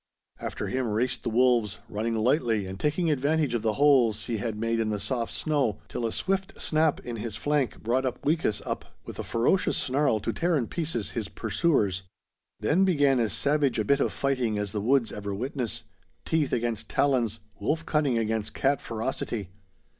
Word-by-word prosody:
After - - -4
him 130 -2 -1
raced 120 +4 0
the - - -2
wolves, 115 -3 +3
running 115 +2 -2
lightly 115 -3 +2
and 95 +1 -7
taking 155 +2 +1
advantage 150 0 +1
of 120 - 0
the 110 -1 +1
holes 125 -7 +4
he 115 - -2
had 110 +1 -3
made 115 +1 0
in 110 -1 0
the 105 - 0
soft 120 +1 -2
snow, 140 - 0
till 115 - -2
a - - -3
swift 195 - -2
snap 155 -1 +2
in 120 -1 -5
his 110 -1 -5
flank 145 +1 -1
brought 125 +4 +1
Upweekis 145 -3 0
up - - -5
with - - -8
a - - -2
ferocious 120 +11 +2
snarl 130 -3 +2
to - - -2
tear 175 0 +1
in 130 -6 +1
pieces 150 - -3
his 110 -4 -3
pursuers. 105 - +1 0.6
Then 150 - +3
began 145 -8 +3
as 115 -3 +1
savage 145 -2 +1
a 110 - 0
bit 140 +5 +3
of - - +1
fighting 130 -6 0
as 105 -1 -2
the 105 - -2
woods 125 +1 +2
ever 100 -1 -4
witness, 125 0 -3 0.4
teeth 160 -3 +1
against 115 -2 -1
talons, 120 -6 +1 0.2
wolf 160 +11 -1
cunning 145 -6 +1
against 110 -1 -1
cat 140 0 +2
ferocity. 110 -4 -3
120 Hz, 185 wpm, -27 LUFS, 110-145 Hz, 0.6 s, holes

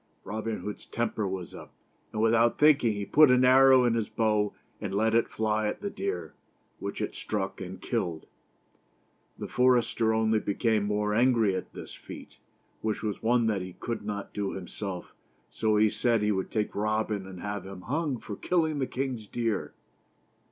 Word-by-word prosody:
Robin 110 +1 -4
Hood's 105 - -7
temper 110 -3 -1
was 95 -2 -5
up; - - -11 0.4
and, 110 - -1
without 115 +1 +4
thinking, 145 -7 +5
he 100 -1 -4
put 150 +6 +6
an 125 0 +5
arrow 130 0 +7
in 120 - +3
his 115 -2 -1
bow 105 -2 +1 0.3
and 100 -2 -3
let 110 +2 +2
it 115 0 +3
fly 110 -1 0
at - - -3
the 200 -1 -3
deer, 400 +1 -4 0.5
which - - -5
it - - -2
struck 95 -2 -3
and 95 0 -7
killed. 90 -9 -2 1.1
The - - -5
forester 120 -3 +3
only 110 0 +2
became 105 +1 0
more 105 0 0
angry 115 -4 +3
at - - -5
this - - -9
feat, - - -11 0.4
which 110 0 -2
was 105 -2 -3
one 120 +1 +3
that 105 -4 +1
he 90 0 -7
could 115 +3 -5
not 105 -1 -5
do 100 -1 -2
himself, 95 0 -6 0.4
so 110 -1 +1
he 110 +1 +5
said 115 0 +1
he 105 - +2
would 95 -2 -1
take 105 -2 -1
Robin 105 -1 -1
and 95 -1 -9
have 100 -1 -5
him 95 -1 -9
hung 145 - -1
for 105 -2 -7
killing 160 - 0
the 130 - 0
king's 125 -5 -3
deer. 115 -2 -2
110 Hz, 180 wpm, -28 LUFS, 105-120 Hz, 1.1 s, arrow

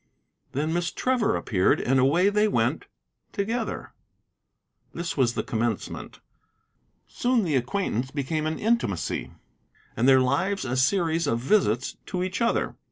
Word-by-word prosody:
Then 155 +4 -1
Miss 175 0 0
Trevor 255 -4 +1
appeared, 95 -4 +2
and 135 +2 +2
away 165 +9 +4
they 210 +1 +2
went 210 - 0 0.5
together. 225 +3 -3 1.0
This 170 0 -3
was 125 -4 +2
the - - -1
commencement. 115 -2 -3 0.9
Soon 245 -2 +1
the 160 -6 0
acquaintance 130 - -1
became 150 +3 -2
an 160 - -2
intimacy, 215 - -1 0.7
and 120 +4 +2
their 135 -1 +7
lives 140 +9 0
a 130 0 -2
series 165 +3 +1
of 115 - +1
visits 125 - +1
to 180 -1 -2
each 185 +5 -3
other. 230 - +1
160 Hz, 135 wpm, -26 LUFS, 130-200 Hz, 1.0 s, their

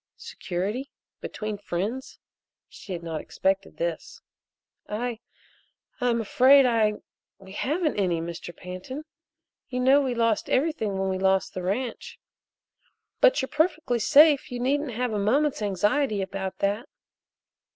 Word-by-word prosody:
Security? 245 - -4 0.3
Between 215 -1 -5
friends? 205 +8 -4 0.5
She - - -12
had 170 -1 -6
not 160 -2 -4
expected 195 +1 -1
this. 170 -1 -4 0.7
"I 230 +2 -3 0.8
I'm 240 -1 +1
afraid 260 +5 +6
I 225 -3 +3 0.4
we 190 -1 -14
haven't 300 - -1
any, 180 -4 +1
Mr. 170 +1 -6
Pantin. 185 +12 -7 0.6
You 250 -2 -3
know 265 +3 +5
we 260 -3 -1
lost 230 -2 +1
everything 255 -9 0
when 190 0 -1
we 190 0 -2
lost 190 0 +1
the 185 - -4
ranch. 225 +7 -3 1.0
But - - +4
you're 265 - -4
perfectly 305 -6 0
safe 290 +3 +5
you 245 - -4
needn't 275 +1 0
have 245 0 -2
a 210 - 0
moment's 270 +7 +1
anxiety 210 +3 +1
about 190 0 -5
that." 205 +4 -1
225 Hz, 130 wpm, -26 LUFS, 190-265 Hz, 1.0 s, afraid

